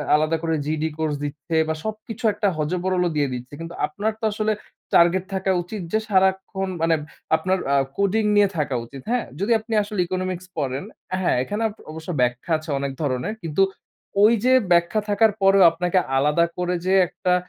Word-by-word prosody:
আলাদা 155 +2 +1
করে 165 -1 +1
GED 155 0 -1
course 155 -2 -1
দিচ্ছে 145 +2 -4
বা 160 - -1
সবকিছু 215 +1 -6
একটা 205 0 0
হযবরল 180 +4 0
দিয়ে 145 -1 +2
দিচ্ছে। 125 +2 -7
কিন্তু 165 +1 -7
আপনার 205 +9 -2
তো - - -22
আসলে 215 +1 0 0.4
টার্গেট 175 +2 +4
থাকা 190 0 0
উচিত 195 +3 -6
যে, 220 - +2
সারাক্ষণ 190 0 +1
মানে 165 0 +3 0.4
আপনার 190 +3 0 0.2
আ - - +4 0.2
কোডিং 200 +2 +2
নিয়ে 205 -1 +5
থাকা 145 -3 0
উচিত। 135 +2 -10
হ্যাঁ? 245 -1 +1
যদি 205 +5 0
আপনি 225 +1 -7
আসলে 205 -1 -5
ইকোনমিক্স 185 -1 -3
পড়েন, 135 -2 -2 0.4
হ্যাঁ, 185 - +2
এখানে 205 +9 -4
আব 210 - -7 0.2
অবশ্য 160 +2 -9
ব্যাখ্যা 125 +6 -1
আছে 155 +1 -11
অনেক 140 0 -2
ধরনের। 140 +8 -1
কিন্তু 165 +3 0 0.6
ওই 220 - +7
যে 255 - +5 0.2
ব্যাখ্যা 170 +5 +3
থাকার 210 +1 +4
পরেও 195 0 +6
আপনাকে 175 +2 -1 0.2
আলাদা 150 +5 +3
করে 180 0 0
যে 190 - +4
একটা 180 - 0
180 Hz, 180 wpm, -23 LUFS, 155-200 Hz, 0.6 s, ওই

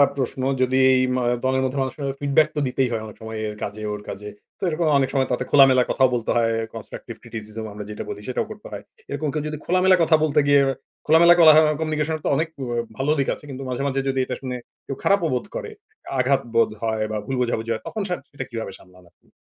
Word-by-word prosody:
প্রশ্ন 130 -1 -2 0.2
যদি 130 +1 +2 0.3
ইমা 125 0 0 0.2
দলের 130 0 +1
মধ্যে 130 +1 -1
মানুষকে 130 +3 -3
কিন্তু 135 -1 -2
ফিডব্যাক 145 +2 +4
তো - - 0
দিতেই 130 0 0
হয় 115 - -1
অনেক 105 - -11
সময়। 110 0 -6
এর 105 - -5
কাজে, 105 +1 -5
ওর 105 - -6
কাজে। 105 +1 -6 0.3
তো - - -36
এরকম 160 0 0
অনেক 135 -1 +1
সময় 135 -2 +2
তাতে 125 - 0
খোলামেলা 135 -3 +7
কথাও 130 -1 +3
বলতে 115 -2 -1
হয়। 115 -1 +2 0.2
কনস্ট্রাকটিভ - - -8
ক্রিটিসিজম 110 -1 -7
আমরা 105 0 -7
যেটা 105 - -5
বলি 105 - -6
সেটাও 130 - -1
করতে 210 -1 -10
হয়। - - -7 0.3
এরকম 150 +2 -2
কেউ 155 - -1
যদি 155 0 -4
খোলামেলা 185 +1 +4
কথা 160 - +5
বলতে 150 -1 +2
গিয়ে, 140 -1 +6 0.4
খোলামেলা 170 +3 +7
কোলাহ 155 -2 +8 0.2
কমিউনিকেশন 155 0 -1
এর - - -18
তো - - +2
অনেক 160 +3 0 0.5
ভালো 140 +3 +1
দিক 135 - +1
আছে। - - -11
কিন্তু 135 0 -6
মাঝে, 125 +2 -2
মাঝে 135 0 -1
যদি 135 0 0
এটা 125 - -4
শুনে 130 -1 -4 0.3
কেউ 135 - -4
খারাপও 195 -4 +3
বোধ 125 - -1
করে, 440 - -5 0.5
আঘাত 135 +2 +3
বোধ 115 - +4
হয়, 110 -1 0
বা 110 - -2
ভুল 135 - -3
বোঝাবুঝি 115 -1 -1
হয় 110 - -5
তখন 220 - -4
সেট 180 - -2
সেটা 135 -2 -6
কিভাবে 115 -4 -4
সামলান 90 -1 -19
আপনি? - - -36
130 Hz, 225 wpm, -23 LUFS, 115-150 Hz, 0.5 s, কোলাহ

